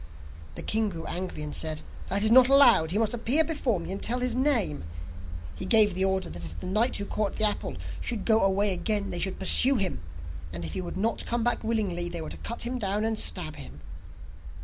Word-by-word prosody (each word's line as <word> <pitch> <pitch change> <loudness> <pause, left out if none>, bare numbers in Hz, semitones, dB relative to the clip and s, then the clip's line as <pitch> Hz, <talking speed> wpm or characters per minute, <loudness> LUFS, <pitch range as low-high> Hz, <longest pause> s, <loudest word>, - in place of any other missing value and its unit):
The - - -7
king 220 0 0
grew 165 -4 -8
angry, 180 -3 -5
and 150 - -6
said: 155 -1 -3 0.2
'That 200 +2 -1
is 220 - +3
not 250 +1 +7
allowed; 240 - +6
he 190 - -2
must 225 +1 0
appear 245 +7 +2
before 285 - -2
me 170 - -7
and 195 - -5
tell 245 - 0
his 250 -1 -1
name.' 245 - 0 0.7
He - - -8
gave 210 +1 +5
the 190 +2 0
order 190 -2 -1
that 85 - -9
if 80 0 -9
the - - -8
knight 215 +7 +2
who 200 - -4
caught 210 0 -3
the - - +1
apple, 210 - -1 0.2
should 230 -4 -4
go 220 -1 +3
away 195 +1 +1
again 200 +2 -2
they 175 - -5
should 190 +1 -2
pursue 255 +8 +6
him, 195 - -2 0.5
and 85 0 -6
if 80 - -6
he - - -3
would 175 - -7
not 220 +4 -2
come 235 -1 -1
back 240 0 0
willingly, 200 -6 -2
they 170 0 -6
were 160 - -7
to - - -7
cut 235 - -5
him 250 +1 -4
down 205 0 -1
and 225 0 -1
stab 75 0 0
him. 70 +1 -11
200 Hz, 230 wpm, -26 LUFS, 175-230 Hz, 0.7 s, not